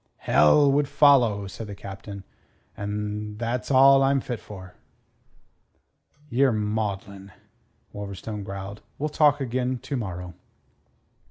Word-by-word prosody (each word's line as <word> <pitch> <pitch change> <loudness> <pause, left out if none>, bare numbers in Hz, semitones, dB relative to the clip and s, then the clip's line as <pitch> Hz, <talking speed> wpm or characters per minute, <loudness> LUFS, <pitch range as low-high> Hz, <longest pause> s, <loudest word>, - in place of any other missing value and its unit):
"Hell 140 - +4
would 145 +1 +2
follow," 125 -9 +4
said 100 +4 -8
the 100 - -7
Captain. 100 0 -9 0.5
"An' 105 +1 -4
tha's 120 +2 -3
all 135 0 +6
I'm 135 0 +3
fit 120 -3 -5
for." 95 -3 -11 1.5
"Ye're 135 0 +2
maudlin," 105 -2 -3 0.6
Wolverstone 100 +1 -6
growled. 100 +1 -7 0.2
"We'll 150 +2 -2
talk 150 -1 +3
again 130 0 -1
to 130 +3 -5
morrow." 90 -6 -5
105 Hz, 110 wpm, -25 LUFS, 100-135 Hz, 1.5 s, all